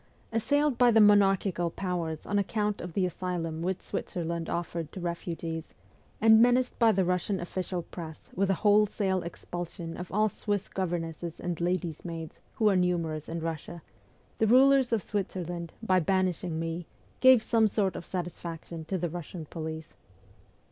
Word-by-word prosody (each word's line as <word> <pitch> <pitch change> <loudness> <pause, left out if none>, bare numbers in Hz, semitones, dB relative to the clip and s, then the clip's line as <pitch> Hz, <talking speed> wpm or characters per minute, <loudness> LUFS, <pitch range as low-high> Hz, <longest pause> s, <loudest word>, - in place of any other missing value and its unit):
Assailed 285 +3 +1
by 245 -1 +7
the 225 -1 +5
monarchical 195 -4 +4
powers 170 -3 -3
on 205 +1 +1
account 210 +1 -1
of 175 -1 -6
the 190 +1 +1
asylum 175 -3 -3
which 185 +2 -2
Switzerland 170 -1 -3
offered 170 -2 -3
to - - -7
refugees, 170 -2 -4 0.4
and 220 +1 +7
menaced 245 +1 +3
by 230 -2 +6
the 190 -2 +2
Eussian 180 +2 0
official 180 0 -3
press 160 -2 -9
with 195 +1 +1
a 195 - +3
wholesale 205 -2 +3
expulsion 175 0 -6
of 180 - -7
all 215 +3 +3
Swiss 205 -1 -2
governesses 170 -2 -3
and 175 -2 -3
ladies' 175 -2 -1
maids, 165 -2 -7
who 220 - +2
are 200 - +4
numerous 170 -4 0
in 165 0 -3
Russia, 165 0 -5 0.6
the 220 - +3
rulers 265 +2 +5
of 225 -5 +1
Switzerland, 175 -4 -3
by 185 -4 +3
banishing 180 -2 0
me, 165 +1 -4 0.3
gave 260 -3 +7
some 225 -2 +3
sort 200 -2 0
of - - -5
satisfaction 170 -2 -5
to 190 +4 -2
the 175 0 -1
Russian 170 0 -7
police. 160 0 -6
180 Hz, 155 wpm, -29 LUFS, 165-205 Hz, 0.6 s, by